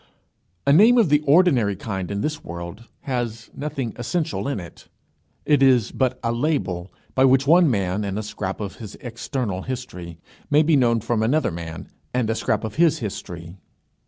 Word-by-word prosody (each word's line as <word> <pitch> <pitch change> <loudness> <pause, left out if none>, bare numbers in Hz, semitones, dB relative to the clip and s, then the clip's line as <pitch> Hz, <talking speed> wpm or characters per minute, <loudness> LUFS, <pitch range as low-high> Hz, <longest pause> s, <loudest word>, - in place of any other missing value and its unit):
A 140 - +5
name 220 +9 +7
of 220 -9 +4
the 150 0 +5
ordinary 140 - +4
kind 95 -2 -4
in 100 0 -2
this 155 +4 -3
world, 85 +6 -8 0.2
has 120 -4 -4
nothing 140 -6 -4
essential 120 - -2
in 140 -7 -2
it. 85 -3 -12 0.6
It 145 -2 +3
is 130 -5 +4
but 130 -1 0
a 115 - +1
label 115 - -1 0.2
by 130 - +3
which 135 +1 +4
one 170 +2 +6
man 100 -3 0
and 100 0 -3
a 110 - -2
scrap 95 -2 -5
of 100 -2 -5
his 105 -3 -9
external 115 -4 -4
history 90 -9 -6 0.3
may 150 +1 +5
be 155 0 +3
known 120 -4 +3
from 115 0 0
another 135 +3 +1
man 80 -1 -7 0.3
and 120 -3 +1
a - - -1
scrap - - -1
of 110 +2 -5
his 165 -2 +4
history. 90 - -7
115 Hz, 180 wpm, -23 LUFS, 100-140 Hz, 0.6 s, name